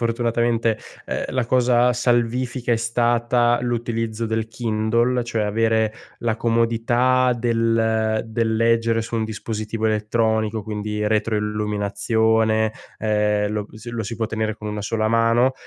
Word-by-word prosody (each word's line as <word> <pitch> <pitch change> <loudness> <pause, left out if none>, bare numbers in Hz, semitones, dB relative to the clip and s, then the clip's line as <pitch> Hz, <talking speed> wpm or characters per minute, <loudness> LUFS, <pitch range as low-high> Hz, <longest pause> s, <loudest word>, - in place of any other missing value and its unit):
fortunatamente, 115 -1 0 0.3
ehm, - - -2
la 130 -2 0
cosa 125 0 +3
salvifica 120 +1 0
è - - +3
stata 120 +1 +2
l'utilizzo 115 -2 -2
del 110 0 -1
Kindle, 115 +2 0
cioè 115 -2 -1
avere 110 +1 +1 0.3
la 115 -2 -1
comodità 120 +2 +2
del 115 -1 +1
del 110 0 -1
leggere 115 0 +2
su 115 - -7
un 110 -1 0
dispositivo 110 0 -4
elettronico, 110 0 0
quindi 105 0 -3
retroilluminazione, 110 +1 +1 0.3
ehm, 105 -1 +1
lo 105 -1 -3
si 110 +2 -9
lo 115 -1 -3
si 115 +2 -5
può 115 - -1
tenere 110 0 -2
con 105 - -6
una 105 0 -4
sola 110 +1 -1
mano, 115 +3 +3
115 Hz, 130 wpm, -22 LUFS, 110-120 Hz, 0.3 s, cosa